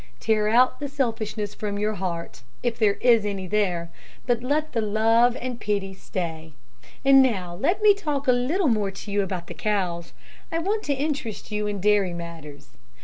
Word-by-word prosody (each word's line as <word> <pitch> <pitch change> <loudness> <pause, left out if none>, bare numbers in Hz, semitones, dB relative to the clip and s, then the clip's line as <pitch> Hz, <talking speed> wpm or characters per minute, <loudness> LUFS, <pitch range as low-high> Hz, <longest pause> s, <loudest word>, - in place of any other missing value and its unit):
Tear 215 -1 +1
out 245 +4 +4
the 290 - -3
selfishness 225 -6 -2
from 205 -1 -4
your 210 +1 0
heart, 175 -7 -5 0.2
if 240 -1 -1
there 205 -3 +3
is 235 -3 +5
any 200 -2 -3
there, 180 -4 -1 0.3
but 240 -2 +1
let 300 +5 -1
the 230 - +1
love 225 +3 +3
and 250 -1 -5
pity 200 -2 -1
stay. 160 -4 -5 0.5
And 270 0 +8
now 190 -9 0
let 355 - 0
me 420 -1 +8
talk 300 -8 -3
a - - +7
little 285 +9 +1
more 215 -5 +1
to 195 +2 -8
you 205 0 +2
about 185 -3 -4
the - - -8
cows. 180 -5 -2 0.4
I 330 - 0
want 405 +6 0
to 290 - +1
interest 275 -7 -3
you 210 0 -1
in 205 -1 -3
dairy 200 -2 +2
matters. 160 -4 -9
215 Hz, 185 wpm, -25 LUFS, 190-255 Hz, 0.5 s, And